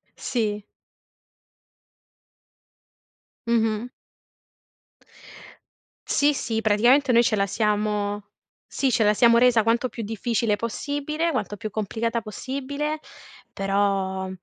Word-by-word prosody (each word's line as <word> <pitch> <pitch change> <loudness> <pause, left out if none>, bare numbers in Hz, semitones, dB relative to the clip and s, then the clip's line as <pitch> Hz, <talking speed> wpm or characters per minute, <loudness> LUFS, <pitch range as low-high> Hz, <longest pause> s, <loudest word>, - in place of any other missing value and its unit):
Sì. 210 -4 -2 2.8
Mh-mh. 225 0 0 2.2
Sì, 290 +1 +3
sì, 225 -3 -2
praticamente 240 +6 +4
noi 235 +1 +6
ce 220 -2 +1
la 200 0 +1
siamo 210 0 -1 0.5
sì, 270 - +1
ce 225 - +2
la 210 0 +4
siamo 235 +1 +5
resa 240 -2 +4
quanto 235 +3 +1
più 230 -2 -6
difficile 225 0 -1
possibile, 290 +8 -2
quanto 205 0 -3
più 215 +2 -6
complicata 225 +2 -2
possibile. 280 +7 -4 0.5
Però, 195 -1 0
225 Hz, 95 wpm, -24 LUFS, 210-250 Hz, 2.8 s, noi